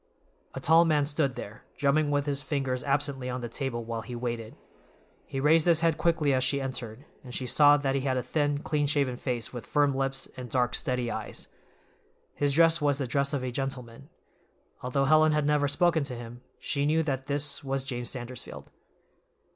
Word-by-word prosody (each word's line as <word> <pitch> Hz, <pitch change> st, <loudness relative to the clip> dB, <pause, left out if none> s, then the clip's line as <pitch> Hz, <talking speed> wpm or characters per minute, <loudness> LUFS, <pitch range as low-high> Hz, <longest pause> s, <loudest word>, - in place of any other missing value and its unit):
A -, -, -3 dB
tall 165 Hz, +2 st, +5 dB
man 150 Hz, -3 st, +2 dB
stood 145 Hz, -3 st, 0 dB
there, 105 Hz, +2 st, -8 dB
drumming 145 Hz, +2 st, +2 dB
with 145 Hz, -1 st, +1 dB
his 140 Hz, -1 st, -1 dB
fingers 135 Hz, -3 st, -2 dB
absently 140 Hz, -2 st, -1 dB
on 125 Hz, 0 st, -3 dB
the 120 Hz, -, -4 dB
table 120 Hz, -1 st, -3 dB
while 115 Hz, 0 st, -4 dB
he 120 Hz, +2 st, -7 dB
waited. 120 Hz, -2 st, -4 dB, 0.7 s
He 135 Hz, -, -4 dB
raised 155 Hz, +4 st, +4 dB
his 165 Hz, -2 st, +4 dB
head 165 Hz, -2 st, +2 dB
quickly 165 Hz, -4 st, +2 dB
as 130 Hz, -1 st, +2 dB
she 140 Hz, +2 st, +1 dB
entered, 130 Hz, -1 st, -5 dB, 0.2 s
and 125 Hz, -2 st, -8 dB
she 130 Hz, -, -3 dB
saw 145 Hz, +3 st, +6 dB
that 140 Hz, -2 st, -1 dB
he 135 Hz, -, 0 dB
had 130 Hz, -1 st, 0 dB
a 125 Hz, -, -1 dB
thin, 145 Hz, 0 st, -1 dB
clean 150 Hz, -1 st, 0 dB
shaven 140 Hz, -3 st, +1 dB
face 120 Hz, -2 st, -4 dB
with 120 Hz, -3 st, -6 dB
firm 145 Hz, -2 st, +2 dB
lips 135 Hz, 0 st, -2 dB
and 125 Hz, -1 st, -7 dB
dark, 125 Hz, -1 st, +1 dB
steady 125 Hz, -4 st, -1 dB
eyes. 110 Hz, -, -6 dB, 0.8 s
His 145 Hz, -1 st, 0 dB
dress 165 Hz, +1 st, +5 dB
was 145 Hz, -2 st, +2 dB
the 140 Hz, -, -2 dB
dress 140 Hz, +3 st, 0 dB
of 140 Hz, -3 st, -2 dB
a 130 Hz, -, -3 dB
gentleman. 135 Hz, 0 st, -5 dB, 0.7 s
Although 135 Hz, +2 st, 0 dB
Helen 155 Hz, +1 st, +5 dB
had 150 Hz, -1 st, +1 dB
never 145 Hz, -1 st, +2 dB
spoken 165 Hz, +3 st, +2 dB
to 130 Hz, -3 st, -5 dB
him, 120 Hz, +1 st, -9 dB, 0.2 s
she 140 Hz, 0 st, -1 dB
knew 160 Hz, +2 st, +2 dB
that 135 Hz, -3 st, -3 dB
this 145 Hz, 0 st, 0 dB
was 135 Hz, -1 st, -2 dB
James 120 Hz, -3 st, -4 dB
Sandersfield. 125 Hz, -1 st, -7 dB
140 Hz, 195 wpm, -28 LUFS, 125-145 Hz, 0.8 s, saw